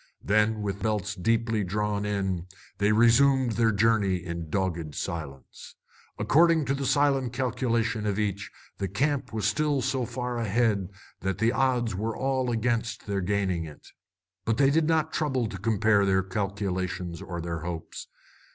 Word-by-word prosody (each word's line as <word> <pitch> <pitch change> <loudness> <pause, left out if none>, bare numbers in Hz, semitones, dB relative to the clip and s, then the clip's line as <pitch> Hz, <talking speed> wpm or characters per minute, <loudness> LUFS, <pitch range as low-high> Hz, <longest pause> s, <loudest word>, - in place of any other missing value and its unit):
Then, 110 +1 +2
with 100 -1 -3
belts 105 -2 -1
deeply 115 +2 0
drawn 105 +2 -1
in, 95 -4 -2 0.3
they 100 +1 +3
resumed 120 +3 +4
their 115 0 +2
journey 105 -2 +2
in 85 -2 -5
dogged 85 -5 -2
silence. 70 -5 -6 0.4
According 165 0 +4
to 135 - 0
the 140 -1 -2
silent 135 -4 +2
calculation 120 -3 0
of 100 -1 0
each, 100 -1 -2 0.3
the 95 - -1
camp 140 - -1
was 110 -3 -2
still 150 +5 +1
so 130 -3 -1
far 125 0 -3
ahead 105 -3 +1 0.3
that 95 0 -2
the 110 +3 +2
odds 125 -4 +1
were 110 +4 -3
all 130 -1 0
against 115 -1 -1
their 100 -1 -1
gaining 95 -3 0
it. 75 -2 -12 0.5
But 115 +1 0
they 135 0 +4
did 155 +1 +2
not 160 -1 +1
trouble 135 -6 0
to 95 -3 -7
compare 110 -1 +3
their 95 -1 +2
calculations 95 -3 -3
or 85 -2 -5
their 85 -1 -3
hopes. 85 0 -6
105 Hz, 155 wpm, -27 LUFS, 95-125 Hz, 0.5 s, resumed